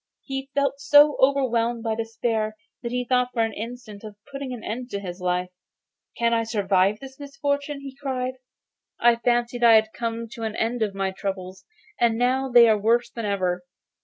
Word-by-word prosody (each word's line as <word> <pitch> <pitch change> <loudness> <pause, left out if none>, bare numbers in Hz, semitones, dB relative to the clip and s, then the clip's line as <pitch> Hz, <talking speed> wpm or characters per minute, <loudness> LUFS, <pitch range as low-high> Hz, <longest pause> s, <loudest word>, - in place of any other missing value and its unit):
He 270 0 -5
felt 280 -1 +1
so 290 +1 +6
overwhelmed 240 -4 +2
by 225 -2 0
despair 225 -1 -2 0.3
that 235 - -4
he 250 0 -1
thought 250 0 +2
for 230 - +2
an 225 -1 -2
instant 225 -2 -8
of 215 -1 -9 0.2
putting 275 -1 -5
an 245 -3 -7
end 245 +3 -5
to 200 - -3
his 180 -2 -7
life. 180 0 0 0.7
'Can 235 0 +2
I 230 - +2
survive 200 -3 +1
my 270 - -8
misfortunes?' 285 0 -3
he 270 -1 -8
cried. 260 -2 -3 0.7
'I 235 0 +5
fancied 240 0 0
I 230 -1 +8
had 220 0 +3
come 230 0 -3
to 235 0 -10
an 220 -1 -3
end 230 +1 -1
of 205 -3 -1
my 195 -1 -1
troubles, 190 -1 -6 0.3
and 230 -1 +3
now 260 +2 +1
they 240 -1 +7
are 215 -2 +3
worse 235 +3 +2
than 230 -2 -5
ever. 185 -3 -1
235 Hz, 190 wpm, -24 LUFS, 215-255 Hz, 0.7 s, I